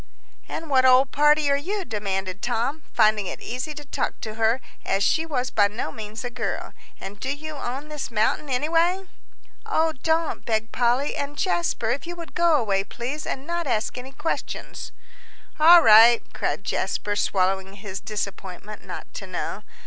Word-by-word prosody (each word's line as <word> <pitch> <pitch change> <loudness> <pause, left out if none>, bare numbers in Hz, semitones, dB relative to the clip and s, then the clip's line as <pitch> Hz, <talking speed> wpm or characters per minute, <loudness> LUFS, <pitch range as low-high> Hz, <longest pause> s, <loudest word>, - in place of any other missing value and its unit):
"And 325 - -5
what 265 -3 +4
old 260 +1 +5
party 295 0 +4
are - - +4
you?" 380 +7 -3
demanded 195 -3 -3
Tom, 245 +6 -1
finding 215 -2 +3
it - - -5
easy 260 +5 -5
to 295 0 -9
talk - - -3
to 215 - -5
her, 225 +3 +2 0.2
as 195 +1 0
she 320 +9 +2
was 255 -5 -2
by 205 - +4
no 210 +3 -4
means 220 +1 -7
a 245 - -4
girl. 230 -4 -4 0.3
"And 205 +1 -8
do 260 - -2
you 305 +2 -5
own 275 +2 -5
this 300 -2 -5
mountain, 230 +6 0
anyway?" 330 +8 +2 0.6
"Oh, 325 -7 +1
don't," 320 0 0
begged 220 -1 -1
Polly. 245 +4 +1
"And 285 +1 -4
Jasper, 340 - 0
if 275 +6 -3
you 345 - -5
would 335 -1 -9
go 340 -2 +4
away, 200 -8 +1
please, 250 +9 -5
and 270 - -4
not 340 -1 -2
ask 220 -4 -1
any 255 +2 -7
questions." 300 +4 -4 0.7
"All 335 +2 +9
right," 225 +2 +8
said - - -2
Jasper, 205 +1 -1
swallowing 190 -1 0
his 195 -1 -7
disappointment 200 -1 -6
not - - -8
to - - -7
know. - - -4
250 Hz, 170 wpm, -24 LUFS, 215-300 Hz, 0.7 s, All